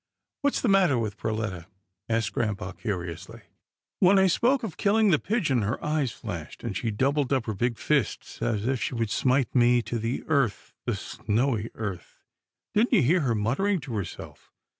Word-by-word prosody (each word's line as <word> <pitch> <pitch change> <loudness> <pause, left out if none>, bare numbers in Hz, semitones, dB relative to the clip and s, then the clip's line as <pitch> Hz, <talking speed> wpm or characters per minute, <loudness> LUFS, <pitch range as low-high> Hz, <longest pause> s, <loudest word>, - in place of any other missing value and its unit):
"What's 285 -1 +1
the - - +1
matter 190 - +4
with 110 -3 -2
Perletta?" 110 -6 -3 0.4
asked 115 -2 0
grampa 100 -4 -2
curiously. 90 -7 -5 0.3
" - - -65
When 190 +2 +6
I 190 - +5
spoke 245 +8 +2
of 210 -7 -4
killing 210 0 +3
the 155 - +4
pigeon, 165 - 0
her 105 +4 -1
eyes 150 -4 0
flashed, 85 -8 -7
and 115 -5 -3
she 115 +6 -1
doubled 135 +5 0
up 130 -4 +1
her 110 - -2
big 120 +3 -1
fists 140 -8 -1
as 105 -2 0
if 130 -2 0
she - - -2
would 115 -3 -1
smite 130 0 +1
me 120 -1 +4
to 120 - -3
the 115 +4 -2
earth 140 -9 0
— - - -62
the - - +1
snowy 115 0 -1
earth. 105 -5 -6 0.5
Didn't 230 +5 +2
you 195 - +5
hear 165 +9 +4
her 125 -5 +1
muttering 140 - +1
to 130 -3 -7
herself? 100 -5 -6
120 Hz, 185 wpm, -27 LUFS, 110-155 Hz, 0.5 s, When